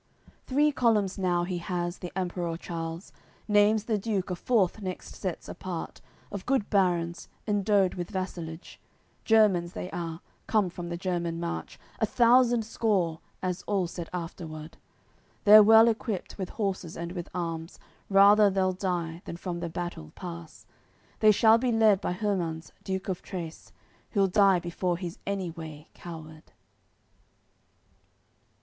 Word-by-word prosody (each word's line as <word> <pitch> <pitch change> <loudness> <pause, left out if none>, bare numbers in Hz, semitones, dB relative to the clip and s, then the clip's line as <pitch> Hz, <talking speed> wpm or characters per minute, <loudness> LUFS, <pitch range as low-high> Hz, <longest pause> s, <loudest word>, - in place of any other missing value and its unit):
AOI. - - -39
CCXIX - - -28
Three 295 +3 +3
columns 215 -8 +2
now, 175 -2 +1
he 180 0 -2
has, 175 0 -3
the 180 - -6
Emperour 175 -3 -2
Charles. 165 +1 -6 0.3
Naimes 210 0 +4
the 220 -3 0
Duke 195 -3 -2
a - - -1
fourth 210 0 +1
next 185 -2 -6
sets 185 -3 -5
apart 180 -3 -6 0.3
Of 200 -2 -6
good 260 -6 +1
barons, 175 -4 +1 0.2
endowed 205 -2 +2
with 175 -1 -5
vassalage; 180 -4 -6 0.5
Germans 195 -6 +4
they 180 - -6
are, 165 -1 -5 0.3
come 205 -5 +2
from 175 0 -6
the 170 - -3
German 170 -2 -2
March, 170 0 -5 0.2
A - - +2
thousand 240 -1 +4
score, 195 -8 0 0.2
as 180 0 -2
all 195 -3 +1
said 170 -1 -6
afterward; 165 -3 -6 0.7
They're 215 +1 +10
well 220 +2 +8
equipped 220 -4 -2
with 190 -3 -4
horses 190 -6 -3
and 170 0 -5
with 175 -2 -6
arms, 165 -1 -4 0.3
Rather 200 +1 +7
they'll 190 -1 +1
die 175 -3 -3
than 170 - -6
from 175 -1 -4
the 170 0 -4
battle 165 - -6
pass; 170 -3 -9 0.5
They 215 - +6
shall 220 +2 +5
be 250 0 +1
led 220 -3 +4
by - - -1
Hermans, 180 -5 -2
Duke 190 0 -3
of 185 -2 -3
Trace, 170 -4 -7 0.4
Who'll 200 -3 +4
die 195 0 +4
before 175 +1 -2
he's 175 -1 -6
any 195 -3 -2
way 160 -2 -9
coward. 160 -2 -11
185 Hz, 150 wpm, -28 LUFS, 170-205 Hz, 0.7 s, They're